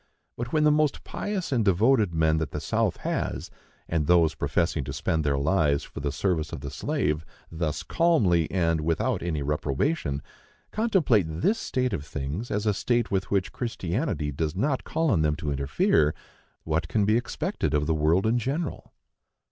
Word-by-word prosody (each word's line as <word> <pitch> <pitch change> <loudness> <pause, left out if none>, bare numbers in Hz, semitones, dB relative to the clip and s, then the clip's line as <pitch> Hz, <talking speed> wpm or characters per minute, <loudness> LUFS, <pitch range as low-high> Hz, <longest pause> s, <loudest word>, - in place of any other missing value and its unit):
But, 120 +1 -5
when 155 -1 +2
the 150 - +5
most 150 -1 +1
pious 200 -6 -4
and 120 -4 +2
devoted 105 +2 +3
men 80 -1 +2
that 80 -3 -2
the - - -4
South - - 0
has, - - -2 0.4
and 80 -3 0
those 85 -3 +4
professing 75 +1 0
to 70 - -5
spend 80 +2 0
their 70 -2 +1
lives 75 -1 +2
for - - -9
the 70 0 -2
service 85 -4 -1
of - - -6
the 70 -1 -6
slave, 75 +1 -1 0.3
thus 80 -2 -2
calmly, 100 - +2
and 85 -3 +1
without 85 +8 0
any 80 -4 -2
reprobation, 75 - -1 0.5
contemplate 180 - +2
this 90 - 0
state 130 -3 -1
of 75 - -2
things 75 - -4
as 105 +1 -1
a 105 - +3
state 120 +4 0
with 95 -1 -1
which 100 -2 0
Christianity 110 - -2
does 75 +3 -2
not 130 +7 0
call 160 -2 0
on 80 - +3
them 75 -1 +2
to 75 -2 -3
interfere, 70 +2 +2 0.5
what 80 +1 -1
can 105 +1 +1
be 110 +2 +3
expected 120 - -1
of 75 0 +1
the 80 - +1
world 80 +5 +2
in 115 +2 +2
general? 140 +7 -3
85 Hz, 180 wpm, -26 LUFS, 75-120 Hz, 0.5 s, the